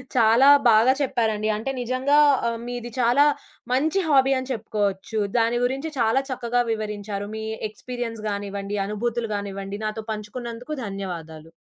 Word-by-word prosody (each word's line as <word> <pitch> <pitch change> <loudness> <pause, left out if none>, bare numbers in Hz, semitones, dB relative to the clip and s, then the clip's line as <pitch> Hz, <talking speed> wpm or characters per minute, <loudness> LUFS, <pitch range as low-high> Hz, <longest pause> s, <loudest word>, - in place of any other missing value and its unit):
చాలా 235 +3 +6 0.2
బాగా 225 +4 +5
చెప్పారండి. 220 -5 0
అంటే 225 +5 -3
నిజంగా 255 +4 +1 0.3
ఆహ్, 230 - -1
మీది 240 -1 -5
చాలా 245 +4 +5 0.5
మంచి 315 +8 +2
హాబీ 270 -3 +4
అని 260 +1 -5
చెప్పుకోవచ్చు. 210 -1 -2 0.2
దాని 230 +1 +2
గురించి 270 +5 -2
చాలా 230 +3 +3
చక్కగా 245 -1 0
వివరించారు. 210 -2 -4
మీ 220 - -5 0.3
ఎక్స్‌పీరియన్స్ 230 +1 -6
గానివ్వండి, 200 0 -4
అనుభూతులు 230 +2 -2
గానివ్వండి 200 0 -5
నాతో 215 +1 -3
పంచుకున్నందుకు 235 +6 -6
ధన్యవాదాలు. 165 -5 -7
225 Hz, 130 wpm, -24 LUFS, 205-245 Hz, 0.5 s, చాలా